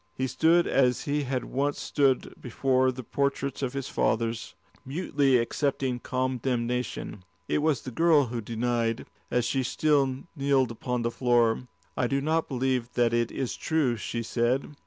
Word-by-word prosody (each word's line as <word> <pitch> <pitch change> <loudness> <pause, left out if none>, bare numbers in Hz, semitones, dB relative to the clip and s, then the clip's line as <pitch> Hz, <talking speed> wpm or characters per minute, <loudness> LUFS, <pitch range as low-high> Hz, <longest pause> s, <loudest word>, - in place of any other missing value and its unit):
He 130 - -1
stood 165 +7 +3
as 125 -2 +2
he 145 0 -1
had 130 -1 -2
once 140 +2 -1
stood 135 -3 +1
before 130 +1 +1
the 130 0 -8
portraits 140 +2 -1
of 130 -1 -2
his 135 -2 -3
fathers, 115 0 -1 0.3
mutely 140 -3 +1
accepting 130 +1 -1
condemnation. 125 -5 -2 0.2
It - - +1
was 150 -2 +1
the 130 - -6
girl 155 +1 +4
who 120 -1 -4
denied, 115 +1 -1 0.2
as 125 -1 +1
she 130 +2 0
still 135 0 +1
kneeled 135 -4 +2
upon 125 +1 -3
the 115 - 0
floor. 120 -1 +2 0.3
"I 120 - +1
do 135 +2 0
not 160 +3 0
believe 130 -2 -1
that 120 -1 +2
is 120 +2 -1
true," 150 -7 +1
she 115 +2 -4
said. 120 +5 0
130 Hz, 155 wpm, -27 LUFS, 120-140 Hz, 0.3 s, girl